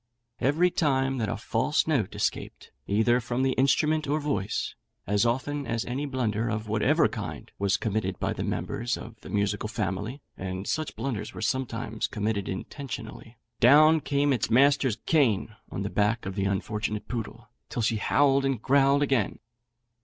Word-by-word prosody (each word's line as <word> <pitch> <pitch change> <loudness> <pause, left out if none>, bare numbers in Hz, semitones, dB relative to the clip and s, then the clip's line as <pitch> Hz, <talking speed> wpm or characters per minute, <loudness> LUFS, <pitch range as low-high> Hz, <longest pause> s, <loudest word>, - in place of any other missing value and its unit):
Every 160 +7 +3
time 135 -5 +1
that 110 - -1
a - - -2
false - - +1
note - - 0
escaped - - -3 0.2
either 110 +4 +3
from 120 +2 -2
the 135 - +2
instrument 150 +4 +2
or 150 +2 +1
voice 110 -10 -2 0.3
as 105 +4 +2
often 140 +4 -1
as 115 -1 -1
any 135 +4 -3
blunder, 115 -4 -1
of 110 -1 -3
whatever 105 0 +3
kind, - - -6
was 100 -1 +2
committed 100 -4 -2
by - - -1
the - - -4
members 120 +1 -2
of 115 -2 -11
the - - -10
musical 105 +1 -1
family 105 +4 -3 0.2
(and 95 +1 -5
such 155 -1 -2
blunders 120 -6 -4
were - - -6
sometimes 115 -3 -2
committed 105 -2 -2
intentionally) 115 +1 -7 0.2
down 155 +6 +7
came 140 0 +1
its 125 - -1
master's 135 -1 +4
cane 115 -9 +2
on 100 - -4
the 100 - -2
back 105 +3 +1
of 95 - -3
the 100 0 -1
unfortunate 105 +2 -2
poodle, 115 0 -6 0.2
till 120 - -2
she 110 0 +1
howled 140 +5 +3
and 135 -5 -1
growled 140 +1 +4
again. 135 -7 +1
115 Hz, 165 wpm, -27 LUFS, 105-135 Hz, 0.3 s, down